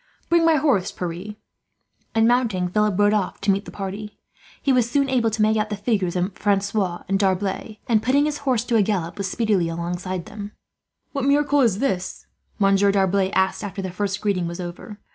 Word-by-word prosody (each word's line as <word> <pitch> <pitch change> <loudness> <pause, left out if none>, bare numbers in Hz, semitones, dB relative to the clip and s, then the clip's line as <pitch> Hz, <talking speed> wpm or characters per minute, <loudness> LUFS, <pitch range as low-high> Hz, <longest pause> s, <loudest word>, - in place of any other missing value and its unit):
"Bring 340 -1 +4
my 325 -1 +5
horse, 270 -11 +2
Pierre," 180 +4 -5 0.8
and, 225 0 +4
mounting, 225 -7 +1
Philip 210 0 +1
rode 205 0 +4
off 205 -3 -1
to 200 0 +3
meet 195 +1 -1
the - - -8
party. 205 +2 -6 0.4
He 275 - +1
was 245 -2 +2
soon 275 +2 +2
able 250 -4 +2
to 215 0 0
make 215 +1 +3
out 215 0 0
the 210 - -2
figures 200 -4 -1
of 180 +2 -1
Francois 200 -3 0
and 195 0 +1
D'Arblay 195 +2 -1
and, 220 -3 +3
putting 270 +6 +3
his 300 -1 -2
horse 255 -5 0
to 240 -1 -1
a - - +5
gallop, 185 -4 -1
was 195 -1 -1
speedily 205 -7 +1
alongside 175 +2 -3
of - - -17
them. 205 0 -8 0.6
"What 275 -2 -2
miracle 285 0 +3
is 225 -7 +3
this?" 190 -7 -2 0.3
Monsieur 200 0 +4
D'Arblay 195 -1 +2
asked, 190 +3 +1
after 195 -1 -5
the 190 - -4
first 200 +2 -2
greeting 195 -5 0
was 170 +1 -6
over. 180 +4 -7
205 Hz, 200 wpm, -23 LUFS, 190-230 Hz, 0.8 s, my